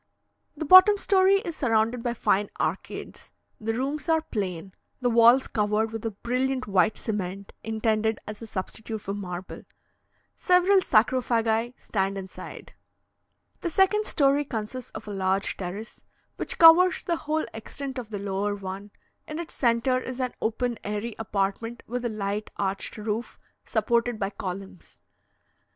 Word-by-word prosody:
The 315 - -3
bottom 370 +6 +9
story 390 0 +4
is 335 -4 -5
surrounded 230 -3 +1
by 240 0 -2
fine 205 -2 +1
arcades; - - -4 0.3
the 225 +1 -2
rooms 275 +4 -3
are 320 -1 +3
plain, 190 - -4 0.3
the 245 -2 +1
walls 235 +3 +6
covered 215 +1 0
with 225 -1 -5
a 225 - -1
brilliant 255 +5 -1
white 200 +1 +2
cement, 200 -2 -4
intended 220 0 0
as 210 +1 -8
a 230 - -7
substitute 220 +3 -5
for 200 -1 -5
marble. 185 -2 -6 0.7
Several 365 +2 +4
sarcophagi 230 -2 +2
stand 195 -1 -2
inside. 190 -1 -9 0.9
The 345 - -2
second 390 +5 +3
story 280 -1 +3
consists 245 -1 -5
of - - -8
a - - -5
large 190 0 0
terrace, 195 +4 -7 0.3
which - - -4
covers 340 +2 +7
the 340 -1 0
whole 310 +1 -1
extent 265 +4 -6
of 235 -3 -8
the 210 - -4
lower 200 +1 -2
one; 195 +1 -7 0.4
in 305 - -5
its 335 -1 -6
centre 240 +1 +2
is 255 0 -6
an 255 -1 -1
open 235 +1 -1
airy 210 +3 -3
apartment 220 +2 -2
with 245 +1 -4
a - - +1
light 210 0 -3
arched 195 +2 -2
roof, 215 +2 -4 0.3
supported 235 -1 +1
by 195 -1 -2
columns. 190 -1 -8
225 Hz, 145 wpm, -26 LUFS, 205-260 Hz, 0.9 s, bottom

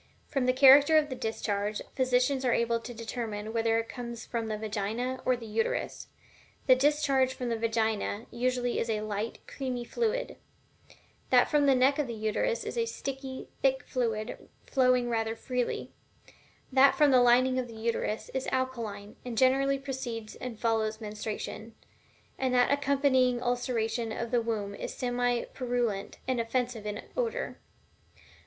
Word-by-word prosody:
From 270 -3 0
the - - +6
character 280 +4 +7
of 300 -1 +2
the 260 - -4
discharge, 210 -3 -2
physicians 260 +1 +2
are 250 -2 +2
able 235 0 +1
to 235 - -8
determine 225 -2 -5
whether 225 0 +2
it 230 0 -1
comes 235 -1 -7
from 230 -2 -3
the 215 -1 -2
Vagina 220 +4 -3
or 255 -1 +3
the 235 - -9
Uterus. 220 +1 -2 0.6
The 260 - +7
discharge 275 -1 +2
from 250 -1 -3
the 230 - 0
Vagina 225 -1 -1
usually 245 0 0
is 230 - -2
a 215 -1 0
light 215 +1 -4
creamy 255 -3 -4
fluid; 475 - -1 0.9
that - - +4
from 295 -2 +4
the 270 - +6
neck 265 +3 +3
of 295 - 0
the 235 - -5
Uterus 220 - -1
is - - -3
a 460 - +1
sticky, 270 - -5
thick 265 -1 +2
fluid 225 -3 -3 0.2
flowing 255 -2 +3
rather 225 -1 -1
freely; 250 +1 -3 0.8
that 270 +1 +6
from 295 -2 +5
the 255 -1 +6
lining 255 +2 +4
of 250 - -3
the 230 - -11
Uterus 220 -1 -2
is 265 0 -3
alkaline, 230 -6 -3
and 245 -2 -6
generally 270 +2 +3
precedes 255 -5 -5
and 240 -4 -7
follows 220 -2 0
menstruation; 215 +1 -6 0.6
and 260 -1 +1
that 245 +1 +4
accompanying 275 -3 +3
ulceration 240 -2 -1
of 235 +1 -4
the 240 -1 +3
womb 215 -3 -2
is - - -6
semi 245 -1 0
purulent 240 -6 -2
and 255 -2 +1
offensive 230 -2 -2
in 210 0 -4
odor. - - -2
245 Hz, 160 wpm, -29 LUFS, 225-260 Hz, 0.9 s, character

